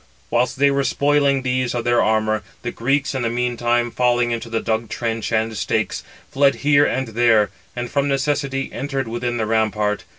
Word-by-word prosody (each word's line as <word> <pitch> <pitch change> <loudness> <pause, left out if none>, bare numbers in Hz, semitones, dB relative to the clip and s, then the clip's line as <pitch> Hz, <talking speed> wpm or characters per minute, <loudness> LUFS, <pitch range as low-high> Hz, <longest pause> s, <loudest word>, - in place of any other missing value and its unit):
Whilst 125 +2 +1
they 140 +1 +4
were 140 0 +1
spoiling 140 -1 +2
these 125 -1 -1
of 120 - -1
their 120 0 +3
armour, 110 0 +1 0.2
the 120 - -3
Greeks 135 +4 0
in 130 - -2
the 115 - 0
meantime 120 0 0
falling 120 -1 +1
into 115 0 -4
the 115 0 -1
dug 110 0 -2
trench 115 -1 -3
and 110 0 0
stakes, 90 -3 -1 0.3
fled 140 0 +3
here 145 -1 +5
and 130 -2 -2
there; 110 -2 +3 0.2
and 120 0 -3
from 140 +3 0
necessity 135 -1 -1
entered 135 -2 -3
within 120 +1 -2
the 110 - 0
rampart. 105 -2 0
120 Hz, 185 wpm, -21 LUFS, 115-135 Hz, 0.3 s, here